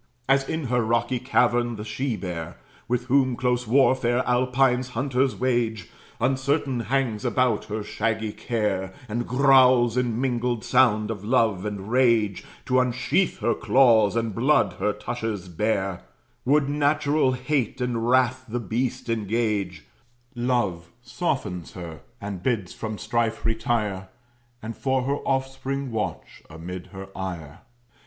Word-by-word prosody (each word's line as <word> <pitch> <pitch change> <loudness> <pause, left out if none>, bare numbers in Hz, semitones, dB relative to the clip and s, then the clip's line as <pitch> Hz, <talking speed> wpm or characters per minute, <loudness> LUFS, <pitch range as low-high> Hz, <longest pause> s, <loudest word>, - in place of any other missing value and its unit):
As 135 0 +2
in 160 0 -2
her 125 -2 +1
rocky 120 +2 0
cavern 120 -1 +1
the 105 - -6
she 120 +2 -2
bear, 85 -5 -6 0.3
With 125 +1 -1
whom 130 -1 +2
close 125 -1 0
warfare 130 -1 +3
Alpine 125 +1 +2
hunters 130 +1 -1
wage, 120 -6 -1 0.3
Uncertain 135 0 0
hangs 120 -3 -1
about 125 -2 +1
her 105 0 -4
shaggy 110 0 -2
care, 95 -5 -2
And 120 +2 -3
growls 125 -2 +5
in 120 -2 0
mingled 125 -3 -1
sound 115 -4 +3
of 105 -3 -6
love 110 -4 +1
and 105 0 -6
rage, 115 -6 +2 0.2
To 130 0 +3
unsheath 130 +9 0
her 120 - +2
claws, 115 -6 +4
and 115 -2 -1
blood 120 -4 +2
her 105 - +1
tushes 105 -2 -4
bare, 95 0 -1 0.4
Would 140 +2 +3
natural 145 -1 +2
hate 130 -1 -1
and 120 -2 -1
wrath 130 0 +3
the 120 +2 -2
beast 120 +4 -2
engage; 105 -5 -1 0.5
Love 120 -9 -1
softens 115 - -3
her, 85 -5 -8 0.2
and 100 -3 -6
bids 105 -6 -1
from 110 -1 -5
strife 115 0 -1
retire, 110 -4 -1 0.5
And 115 +1 -5
for 130 -1 0
her 140 +2 0
offspring 135 0 -2
watch, 110 -2 -4
amid 85 +3 -8
her 95 -1 -9
ire. 85 -6 -6
120 Hz, 135 wpm, -25 LUFS, 105-130 Hz, 0.5 s, growls